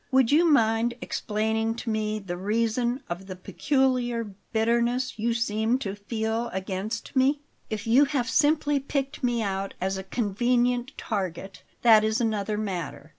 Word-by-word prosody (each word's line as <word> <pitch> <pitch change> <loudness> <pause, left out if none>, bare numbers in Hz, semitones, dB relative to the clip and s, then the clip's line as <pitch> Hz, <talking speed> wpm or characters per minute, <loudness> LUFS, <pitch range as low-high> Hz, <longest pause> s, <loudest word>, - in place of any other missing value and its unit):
Would 260 -2 +3
you 330 +3 +5
mind 230 -3 +3
explaining 220 +1 -1
to 235 -1 -4
me 215 0 -1
the 190 -4 -5
reason 230 +6 0
of 175 +3 -6
the 185 - -6
peculiar 245 0 0 0.2
bitterness 235 +2 +1
you 230 +1 +1
seem 225 +1 +1
to 200 -7 -4
feel 220 +3 -2
against 190 +6 -4
me? 275 +2 +3 0.3
If 215 -2 -4
you 250 +6 +5
have 275 -4 -1
simply 295 -1 +2
picked 275 0 -3
me 240 -2 +1
out 195 -1 -3
as 190 +1 -1
a - - -6
convenient 245 +5 0
target, 195 -2 -4 0.2
that 220 -3 +7
is 220 +2 +1
another 215 -2 -1
matter. 180 -7 -4
225 Hz, 150 wpm, -26 LUFS, 205-250 Hz, 0.3 s, that